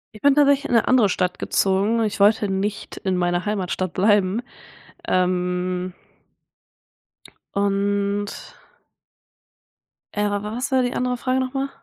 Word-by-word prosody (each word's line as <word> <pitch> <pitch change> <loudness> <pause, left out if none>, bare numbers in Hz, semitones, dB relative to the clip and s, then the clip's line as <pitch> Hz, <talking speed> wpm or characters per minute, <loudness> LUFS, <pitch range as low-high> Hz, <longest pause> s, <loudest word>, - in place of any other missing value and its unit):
Ich 215 - -12
bin 285 0 +4
tatsächlich 285 -1 +4
in - - -1
'ne 230 - +3
andere 240 -6 +4
Stadt 180 0 -1
gezogen. 200 +4 +1
Ich 210 -2 -2
wollte 205 +1 +4
nicht 195 +2 -3
in 190 -2 -1
meiner 175 +1 0
Heimatstadt 185 -3 -2
bleiben. 205 +2 +2 0.6
Ähm 180 0 0 1.6
und 200 0 -1 1.6
äh, 205 0 +1
wa 205 0 -2
was 240 +6 -4
war 260 -1 +3
die 245 - -1
andere 250 0 -1
Frage 255 +1 0
nochmal? 270 +1 -2
205 Hz, 125 wpm, -22 LUFS, 185-240 Hz, 1.6 s, bin